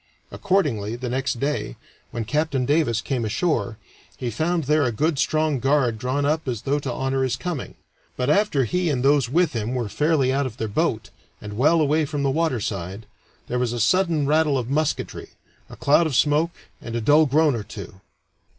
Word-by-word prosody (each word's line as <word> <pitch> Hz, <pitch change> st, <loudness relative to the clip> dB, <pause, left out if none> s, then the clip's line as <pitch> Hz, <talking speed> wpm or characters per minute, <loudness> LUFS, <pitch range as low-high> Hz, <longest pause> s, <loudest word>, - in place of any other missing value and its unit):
Accordingly, 145 Hz, -, 0 dB
the 125 Hz, 0 st, -5 dB
next 130 Hz, -1 st, -1 dB
day, 140 Hz, -, -2 dB, 0.3 s
when 115 Hz, -2 st, -4 dB
Captain 140 Hz, +1 st, 0 dB
Davis 145 Hz, -6 st, +1 dB
came 120 Hz, +3 st, -2 dB
ashore, 110 Hz, -, -1 dB, 0.4 s
he 120 Hz, -2 st, -3 dB
found 165 Hz, +7 st, 0 dB
there 150 Hz, +3 st, +2 dB
a 125 Hz, -, +1 dB
good 150 Hz, +5 st, 0 dB
strong 155 Hz, -1 st, +1 dB
guard 135 Hz, -4 st, +1 dB
drawn 130 Hz, +4 st, -1 dB
up 155 Hz, +1 st, 0 dB
as 120 Hz, -5 st, -3 dB
though 145 Hz, +1 st, 0 dB
to 140 Hz, -3 st, -4 dB
honor 135 Hz, +2 st, -1 dB
his 130 Hz, -2 st, 0 dB
coming. 165 Hz, +1 st, -5 dB, 0.4 s
But 125 Hz, -, -1 dB
after 150 Hz, -3 st, +2 dB
he 180 Hz, +6 st, 0 dB
and 130 Hz, -4 st, -1 dB
those 140 Hz, -4 st, +3 dB
with 170 Hz, +3 st, +2 dB
him 115 Hz, +2 st, -2 dB
were 120 Hz, -4 st, -2 dB
fairly 145 Hz, +2 st, +1 dB
out 140 Hz, 0 st, 0 dB
of 120 Hz, -2 st, -10 dB
their 110 Hz, -, -2 dB
boat, 105 Hz, -, -1 dB, 0.3 s
and 105 Hz, 0 st, -8 dB
well 150 Hz, +8 st, +3 dB
away 155 Hz, +1 st, +2 dB
from 145 Hz, -1 st, -3 dB
the 135 Hz, -, +2 dB
water 155 Hz, -4 st, 0 dB
side, 100 Hz, +1 st, -5 dB, 0.4 s
there 125 Hz, -, -1 dB
was 120 Hz, -1 st, 0 dB
a 120 Hz, -, -3 dB
sudden 165 Hz, -, +2 dB
rattle 150 Hz, -1 st, +2 dB
of 125 Hz, 0 st, -3 dB
musketry, 155 Hz, +1 st, -2 dB, 0.4 s
a -, -, -10 dB
cloud 150 Hz, +4 st, +3 dB
of 145 Hz, -, -3 dB
smoke, 150 Hz, +4 st, +3 dB, 0.3 s
and 115 Hz, -1 st, -6 dB
a -, -, 0 dB
dull 150 Hz, +7 st, +5 dB
groan 150 Hz, +2 st, +3 dB
or 115 Hz, -, -3 dB
two. 100 Hz, -2 st, -10 dB
135 Hz, 195 wpm, -23 LUFS, 120-155 Hz, 0.4 s, dull